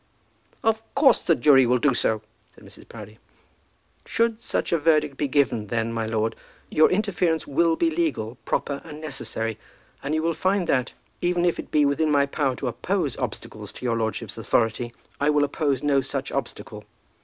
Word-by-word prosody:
"Of 220 -1 +2
course 275 -3 +5
the 165 - +3
jury 135 -1 +5
will 125 +1 +3
do 135 +2 +2
so," 110 -3 +2 0.3
said - - -18
Mrs. - - -13
Proudie. 105 -1 -11 0.8
"Should 230 -1 0
such - - -2
verdict 155 -3 +2
be 145 - -1
given, 130 -6 +1
then, 115 +1 -1
my 115 -1 -2
lord, 110 0 -1 0.4
your 155 - +5
interference 180 -5 0
will 165 +3 +2
be 165 0 +1
legal, 130 -8 -2
proper, 140 -1 -2
and 150 -2 -10
necessary. 115 -7 -3 0.4
And 145 +3 -2
you 155 - 0
will 165 0 +1
find 190 +2 0
that, 130 -5 0 0.3
even 175 0 +1
if 175 - +1
it - - -7
be 150 -1 +3
within 145 +3 +1
my 140 -1 +3
power 140 -2 -1
to - - -4
oppose - - -1
obstacles - - -6
to - - -8
your 120 -2 +1
lordship's 110 -1 -3
authority, 115 +1 0 0.3
I 145 - +2
will 150 -1 +3
oppose 140 -2 -1
no 140 -2 +3
such 135 0 -3
obstacle. 120 -5 -5
140 Hz, 180 wpm, -24 LUFS, 120-165 Hz, 0.8 s, course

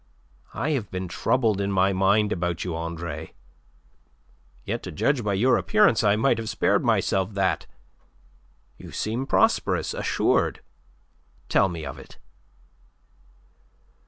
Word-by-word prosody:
I 145 +7 -1
have 120 -10 -2
been 95 0 -4
troubled 110 +3 0
in 100 0 -1
mind 95 +2 +2
about 90 -2 -2
you, 85 -3 -3
Andre. 85 -1 -6 1.3
Yet - - -3
to - - -7
judge 130 - 0
by 100 -2 0
your 125 +7 +3
appearance 210 - +3
I 100 -1 +4
might 115 +1 +2
have 110 -1 -4
spared - - +1
myself 95 +1 +1
that. 95 -1 0 1.1
You - - -11
seem 120 +5 -3
prosperous, - - +1
assured. - - 0 0.9
Tell 95 - +3
me 85 -3 -6
of 65 - -7
it." - - -14
100 Hz, 125 wpm, -25 LUFS, 90-115 Hz, 1.3 s, I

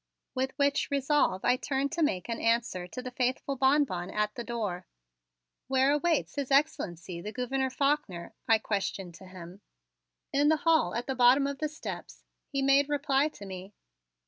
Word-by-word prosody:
With 260 0 -1
which 285 0 +1
resolve 280 -8 +1
I 250 +1 +4
turned 275 +1 -1
to 335 - -2
make 190 - 0
an 230 -1 -3
answer 230 -6 0
to 250 +7 -7
the 255 - -6
faithful 255 +2 -1
Bonbon 265 -10 +2
at 210 +1 -1
the 240 - -5
door. 210 -7 -4 0.8
"Where 265 +1 +3
awaits 315 +2 +1
His 280 -2 -2
Excellency, 180 - 0
the 210 +4 -6
Gouverneur 265 +2 -1
Faulkner?" 270 - -1
I 225 - +6
questioned 195 -4 -3
to 190 - -13
him. 185 +1 -11 0.7
"In 290 +2 +4
the 315 - +4
hall 320 - +3
at 240 +1 -2
the 265 - -2
bottom 255 +2 +5
of 280 -1 -3
the 305 - -1
steps," 305 - -8 0.2
he 275 -2 -2
made 275 +1 +4
reply 285 -1 +2
to 205 -9 -10
me. 190 +1 -9
255 Hz, 170 wpm, -29 LUFS, 200-280 Hz, 0.8 s, I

